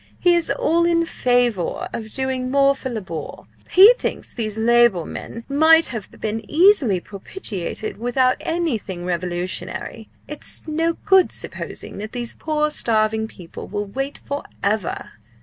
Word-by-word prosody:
He 355 -1 +4
is 340 -1 +1
all 335 +2 +2
in 335 -1 +2
favour 245 - 0
of 220 -1 -5
doing 260 -1 -2
more 275 +1 +4
for 270 -1 -6
Labour. 185 - -6 0.3
He 400 +6 +9
thinks - - -4
these 215 -3 -4
Labour 235 -5 +4
men 230 - -7
might 320 +3 +5
have 220 -5 -6
been 220 +1 -3
easily 310 - +4
propitiated 200 - -6
without 250 +3 +1
anything 230 - -2
revolutionary. 180 +5 -4 0.2
It's 300 +2 -3
no 325 +2 0
good 385 -3 +5
supposing - - -3
that 215 +1 -7
these 240 -1 -4
poor 300 -1 -1
starving 220 -4 +1
people 180 -6 -10
will 205 0 -3
wait 270 +7 -4
for 285 +1 -4 0.2
ever!" 205 -2 -1
240 Hz, 140 wpm, -21 LUFS, 210-300 Hz, 0.3 s, He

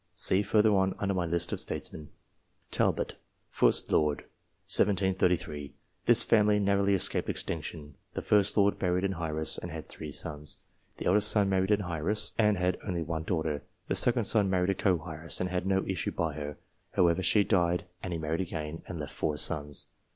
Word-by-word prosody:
See 95 - +2
further 105 +1 +3
on, 95 -1 +2
under 100 -1 -1
my 90 -2 -1
list 85 0 -2
of - - -2
STATESMEN. 75 -2 -5 0.6
Talbot, - - 0 0.4
1st - - +3
Lord 75 -2 +2 0.4
(1733). 90 -6 +1 0.3
This - - +5
family 105 -2 +3
narrowly 100 0 +2
escaped 95 - +2
ex - - 0
tinction. 75 -2 -6 0.2
The - - -2
1st 105 0 +3
Lord 100 0 +3
married 90 0 +1
an 95 0 0
heiress, 80 -3 -1
and - - -7
had - - -7
three 75 - -8
sons. 75 +1 -2 0.4
The - - -6
eldest 105 +3 +4
son 100 -2 +2
married 95 0 +1
an 105 -1 +2
heiress, 90 +4 -1
and 105 -2 +3
had 90 0 0
only 90 -5 -2
one 80 0 -4
daughter. 80 -5 -1 0.3
The - - +1
second 120 -1 +3
son 100 -1 +2
married 90 0 +1
a - - +1
co 90 -4 0
heiress, 80 +1 -2
and 90 0 -2
had 90 +1 -2
no 95 0 +1
issue 95 -5 -2
by 80 -2 -2
her. 75 0 -6 0.4
However, 85 0 +3
she 105 +2 +4
died, 90 -4 +1 0.2
and 95 - -5
he 85 - -2
married 80 +2 -2
again, 80 -3 -5
and 90 - -6
left 75 - -6
four 75 -1 -2
sons. 75 0 0
90 Hz, 190 wpm, -29 LUFS, 80-100 Hz, 0.6 s, This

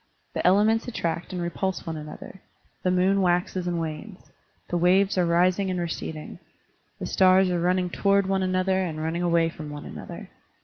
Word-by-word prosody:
The - - -2
elements 215 +5 +3
attract 170 -8 -3
and 180 - -4
repulse 180 +2 -2
one 165 -2 -4
another. 155 +5 -9 0.4
The 185 - 0
moon 185 +2 +3
waxes 180 0 0
and 175 -1 -1
wanes. 165 +5 -7 0.4
The 175 - 0
waves 190 +3 +3
are 180 -2 +2
rising 180 +3 +2
and 180 -1 -1
receding. 160 -2 -5 0.6
The - - -5
stars 185 -1 +4
are 175 - 0
running 180 +1 +1
toward 200 +1 +2
one 190 0 0
another 185 0 +1
and 165 -4 -3
running 160 +2 -2
away 170 -1 +2
from 155 -2 -8
one 145 0 -8
another. - - -9
180 Hz, 175 wpm, -25 LUFS, 170-190 Hz, 0.6 s, stars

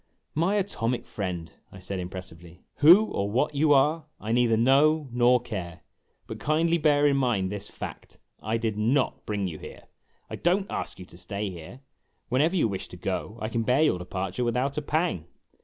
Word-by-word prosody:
"My 170 +6 +1
atomic 125 - -1
friend," 90 -5 -5 0.2
I - - -11
said 95 +1 -5
impressively, 90 -1 -9
"who 175 +9 +8
or 100 - -2
what 130 +8 +1
you 145 +1 +2
are, 150 +3 +3
I 110 - -4
neither 120 -1 +3
know 140 +5 +4
nor 125 +1 +4
care. 90 -9 -6 0.4
But - - -8
kindly 165 +3 +1
bear 145 -1 +3
in 140 -1 +4
mind 115 -8 +1
this 100 -1 -6
fact: - - -9 0.2
I 110 +2 -1
did 110 -2 -2
not 125 +5 0
bring 100 -2 -1
you 80 -4 -7
here. - - -11 0.4
I - - -6
don't 185 +3 +1
ask - - -4
you 90 - -9
to 85 - -14
stay 100 +2 -4
here; 85 +9 -10 0.5
whenever 150 +8 +2
you 160 - +3
wish 95 -3 -5
to - - -11
go, 105 +4 -4
I 110 - -3
can 115 +1 -1
bear 125 +6 +3
your 150 - +2
departure 95 +4 -3
without 125 +4 0
a 150 - -1
pang. 150 - -1
120 Hz, 190 wpm, -26 LUFS, 95-145 Hz, 0.5 s, who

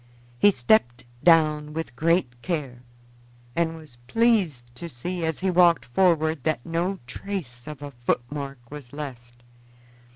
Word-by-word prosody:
He 205 - +7
stepped 125 - +2 0.2
down 155 -3 +4
with 160 -5 -5
great 155 -5 +1
care, 140 -8 -3 0.7
and 165 -1 0
was 155 -7 -14
pleased 180 - +1
to 170 - -6
see, 170 +7 -4
as 160 0 -2
he 190 0 +1
walked 175 -2 +5
forward, 160 0 +2
that 155 -7 -1
no 170 +4 -1
trace 130 -4 -6
of 150 -2 -7
a 145 - -6
footmark 125 +1 -4
was 145 -4 -9
left. 120 -5 -8
150 Hz, 135 wpm, -25 LUFS, 125-170 Hz, 0.7 s, He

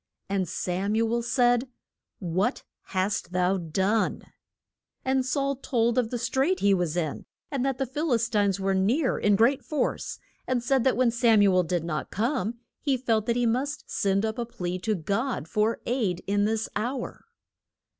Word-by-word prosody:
And 190 -3 0
Sam 190 +4 -1
u 225 +1 +1
el 235 - +1
said, 245 +1 +2 0.5
What 185 - -1 0.2
hast 185 -1 -2
thou 180 +1 +2
done? 190 +6 0 0.8
And 265 0 +2
Saul 275 +1 0
told 240 -2 +1
of 230 -3 0
the 245 - -2
strait 265 +10 +1
he 200 0 +4
was 175 -3 0
in, 155 -4 -3 0.2
and 275 -3 -1
that 270 -1 0
the 270 - 0
Phil 290 +5 -2
is 230 -1 +2
tines 200 -4 +1
were 195 0 +1
near 235 +10 +1
in 205 -1 +3
great 245 +6 +3
force, 295 +4 -2 0.3
and 250 -2 0
said 265 0 +2
that 260 - +3
when 250 -2 +3
Sam 230 -3 +4
u 195 -2 +4
el 185 - +5
did 175 -1 -1
not 155 -2 -3
come 235 0 -1 0.2
he 275 -3 +1
felt 225 -4 0
that 235 - +2
he 245 0 +1
must 260 +6 -1
send 195 +1 +1
up 220 +2 -3
a 240 - -1
plea 180 -5 -4
to 215 +3 0
God 200 - -2
for 215 +5 +1
aid 220 -8 -1
in 205 +1 +1
this 220 +1 0
hour. 240 +4 -3
225 Hz, 185 wpm, -27 LUFS, 195-250 Hz, 0.8 s, el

